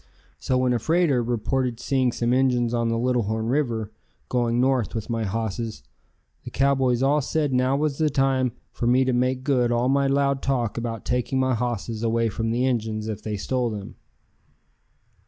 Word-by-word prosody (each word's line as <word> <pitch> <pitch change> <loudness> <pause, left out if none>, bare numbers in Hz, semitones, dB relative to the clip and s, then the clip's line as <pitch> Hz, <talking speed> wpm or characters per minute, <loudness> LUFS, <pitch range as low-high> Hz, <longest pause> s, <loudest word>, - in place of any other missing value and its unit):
So 130 - 0
when 125 -1 +2
a 120 - +1
freighter 160 -1 +2
reported 120 +1 -1
seeing 130 -1 +1
some 120 +1 0
Injuns 125 -2 +2
on 115 -1 +1
the 115 - 0
Little 125 +1 +1
Horn 110 +1 -2
River, 120 -6 -1 0.4
going 120 -1 +1
north 130 -3 +1
with 110 +1 -4
my 115 -1 -1
hosses, 110 +2 -3 0.6
the - - -7
cowboys 135 -2 +2
all 145 +2 +3
said 145 0 -1
now 130 +2 +2
was 150 -1 -1
the 155 -1 +3
time 135 -3 +1 0.2
for 120 - -3
me 130 +2 +4
to 130 - +1
make 130 +1 0
good 125 -4 +2
all 120 +2 +1
my 140 0 +2
loud 140 0 +1
talk 125 -5 -1
about 115 -2 -4
taking 125 +2 0
my 130 0 +2
hosses 115 -2 -3
away 115 0 +1
from 115 +2 -2
the 120 +3 +1
Injuns 110 -4 -1
if 110 -3 -4
they 105 -1 -4
stole 125 +4 -1
them. 105 -3 -7
125 Hz, 185 wpm, -24 LUFS, 115-130 Hz, 0.6 s, me